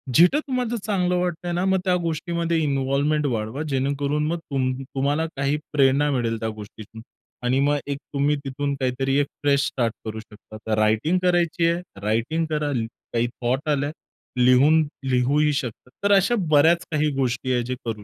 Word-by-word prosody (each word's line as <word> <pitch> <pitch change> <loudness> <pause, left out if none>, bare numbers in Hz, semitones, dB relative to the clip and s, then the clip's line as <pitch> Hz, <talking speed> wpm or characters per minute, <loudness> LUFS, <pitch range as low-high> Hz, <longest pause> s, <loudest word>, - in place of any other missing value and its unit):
जिथं 180 - +6
तुम्हाला 250 -3 -1
चांगलं 180 -4 +1
वाटतंय 175 -1 -2
ना, 175 +2 0
मग 190 0 +2
त्या 180 -1 +3
गोष्टीमध्ये 170 +1 -1
इन्व्हॉल्वमेंट 140 +2 +1
वाढवा. 115 +2 -3
जेणेकरून 140 +2 0
मग 170 +2 -1
तुम 135 -5 -1
तुम्हाला 140 +4 -1
काही 140 +2 +1 0.2
प्रेरणा 140 +1 +3
मिळेल 115 -4 -1
त्या 110 0 -2
गोष्टीतून 110 +1 -10 0.4
आणि 130 +2 +2
मग 145 +1 +2
एक 140 - -2 0.2
तुम्ही 145 +1 +2
तिथून 140 +1 -2
काहीतरी 135 +1 0
एक 145 - +1 0.2
फ्रेश 140 -1 +3
स्टार्ट 115 -4 -1
करू 110 0 -5
शकता. 110 0 -13
तर 110 -1 +1
रायटिंग 110 +12 +2
करायची 175 -1 +2
आहे, 170 +1 -1 0.2
रायटिंग 115 +10 0
करा 150 -1 -1
ल 115 -2 -1 0.3
काही 120 0 +1
थॉट 130 +5 -2
आल्या 145 0 0 0.5
लिहून 135 +6 +5 0.3
लिहूही 140 +4 +2
शकतात. 125 -3 -4
तर 200 - +3
अशा 195 +5 +3
बऱ्याच 160 +3 +4
काही 150 -1 +1
गोष्टी 130 -1 0
आहेत 120 -1 +1
जे 130 +1 -3
करू. 110 -3 -4
140 Hz, 170 wpm, -23 LUFS, 125-160 Hz, 0.5 s, जिथं